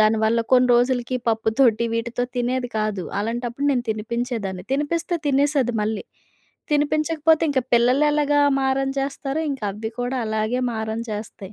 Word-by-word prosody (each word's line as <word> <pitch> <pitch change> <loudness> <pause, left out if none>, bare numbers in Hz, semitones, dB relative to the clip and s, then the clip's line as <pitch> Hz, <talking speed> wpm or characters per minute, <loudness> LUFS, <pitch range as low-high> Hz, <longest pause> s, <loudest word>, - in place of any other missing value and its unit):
దానివల్ల 220 +1 +3
కొన్ని 250 0 +5
రోజులకి 245 +1 +1
పప్పు 225 0 +1
తోటి 235 -4 +4
వీటితో 235 +2 -2
తినేది 245 +1 -1
కాదు. 215 -3 -1 0.2
అలాంటప్పుడు 240 +5 -2
నేను 245 -2 -1
తినిపించేదాన్ని. 220 -4 -3
తినిపిస్తే 315 +5 -1
తినేసేది 280 -3 +2
మళ్ళీ. 215 0 -2 0.7
తినిపించకపోతే, 310 +2 +2
ఇంక 275 -2 +2
పిల్లలెలాగా 290 +4 +3 0.2
మారం 270 0 +1
చేస్తారో 275 +2 -3
ఇంకది 215 -4 -4
కూడా 245 +2 -2
అలాగే 220 +3 -1
మారం 220 0 -3
చేస్తాయి. 210 -2 -7
245 Hz, 125 wpm, -22 LUFS, 220-275 Hz, 0.7 s, కొన్ని